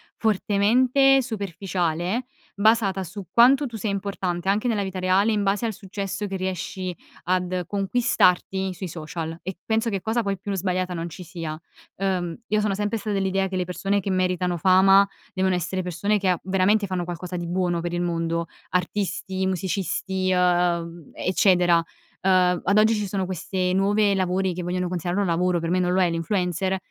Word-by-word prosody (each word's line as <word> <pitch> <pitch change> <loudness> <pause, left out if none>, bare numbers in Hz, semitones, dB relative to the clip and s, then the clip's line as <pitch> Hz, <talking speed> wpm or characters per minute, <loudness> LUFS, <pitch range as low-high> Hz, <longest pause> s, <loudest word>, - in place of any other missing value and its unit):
fortemente 245 +6 +3
superficiale 190 -1 -2 0.3
basata 200 -2 +2
su 190 +2 -8
quanto 265 +5 +6
tu 235 -3 -7
sei 215 0 -2
importante, 190 -2 -2
anche 210 +5 +1
nella 210 -4 +1
vita 190 -1 -4
reale, 190 +4 +3
in 210 -1 +1
base 200 +3 0
al 220 - -1
successo 200 +1 -5
che 195 - -4
riesci 185 -1 -4 0.3
ad 180 0 0
conquistarti 195 -2 +1
sui 185 +1 -5
social. 165 0 -6
E 185 0 -6
penso 225 +1 +1
che 195 -2 -2
cosa 225 +4 0
poi 200 -2 -2
più 200 +1 -5
sbagliata 185 -1 -1
non 170 0 -4
ci 180 +2 -9
sia. 160 -2 -6 0.4
Uhm, 180 -3 -2
io 215 -1 +1
sono 205 -2 0
sempre 210 +2 -1
stata 210 -1 -3
dell'idea 195 0 0
che 190 - -5
le 180 -1 0
persone 195 +3 -1
che 195 0 -3
meritano 180 -1 0
fama 195 +2 +5 0.3
devono 185 -1 +1
essere 180 +2 -2
persone 185 +4 0
che, 190 -1 +1
uhm, 180 - +2
veramente 195 +3 +2
fanno 185 -2 -2
qualcosa 175 +1 -6
di 170 -1 -4
buono 175 -1 0
per 175 0 -4
il 175 - -1
mondo: 170 -1 -1 0.3
artisti, 190 0 -1
musicisti, 190 0 -1
uhm, 175 -2 +1
eccetera. 180 -1 +3 0.5
Uhm, 180 -2 +3
ad 200 +3 +2
oggi 220 +1 +5
ci 210 -2 -1
sono 190 -1 -2
queste 185 0 -2
nuovi 200 +1 +3
lavori, 185 0 0
che 180 - -5
vogliono 180 +1 -2
considerare 180 +2 -2
un 195 - 0
lavoro. 180 +1 +1
Per 165 +1 -3
me 185 - +2
non 180 0 +1
lo 190 - +2
è, 175 - +3
l'influencer 180 +2 -1
185 Hz, 180 wpm, -24 LUFS, 180-200 Hz, 0.5 s, quanto